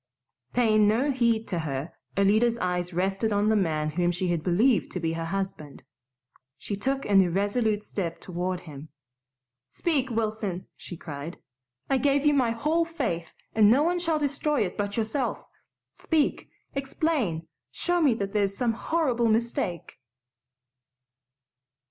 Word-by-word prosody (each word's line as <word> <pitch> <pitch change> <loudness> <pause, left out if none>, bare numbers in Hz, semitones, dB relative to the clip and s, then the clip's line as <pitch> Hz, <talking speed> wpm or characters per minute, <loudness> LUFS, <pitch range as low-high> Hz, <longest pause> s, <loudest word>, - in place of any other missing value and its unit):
Paying 215 -3 +4
no 245 +7 +2
heed 235 -4 +1
to 175 - -1
her, 150 0 -4 0.2
Alida's 215 +4 +3
eyes 180 -2 -1
rested 195 +5 0
on 205 +1 +2
the 220 - +3
man 155 -6 0
whom 175 +2 +1
she 180 +1 -2
had 170 -2 0
believed 205 +8 +3
to 180 - -2
be 165 -1 -1
her 165 0 -3
husband. 190 -6 -4 0.7
She 200 - -4
took 270 +7 -1
an 200 -2 +5
irresolute 205 +4 +1
step 175 -6 -4
toward 180 0 -3
him. 150 -1 -10 0.8
"Speak, 285 -6 0
Wilson!" 215 -5 -2
she 175 - -9
cried. 150 +2 -7 0.5
"I 270 - +2
gave 280 +1 +2
you 295 - +5
my 260 -4 +3
whole 305 +9 +1
faith 240 - -3 0.2
and 215 -2 +6
no 265 +6 +5
one 350 +2 +1
shall 330 -2 +1
destroy 290 0 0
it 180 - -5
but 205 0 -3
yourself. 230 +4 -1 0.5
Speak, 315 -3 0 0.2
explain! 270 - -1 0.2
Show 350 - 0
me 275 -7 +4
that 200 -2 -3
there's 200 -2 +1
some 240 -3 +1
horrible 250 -3 0
mistake." 220 - -1
215 Hz, 145 wpm, -27 LUFS, 180-260 Hz, 0.8 s, and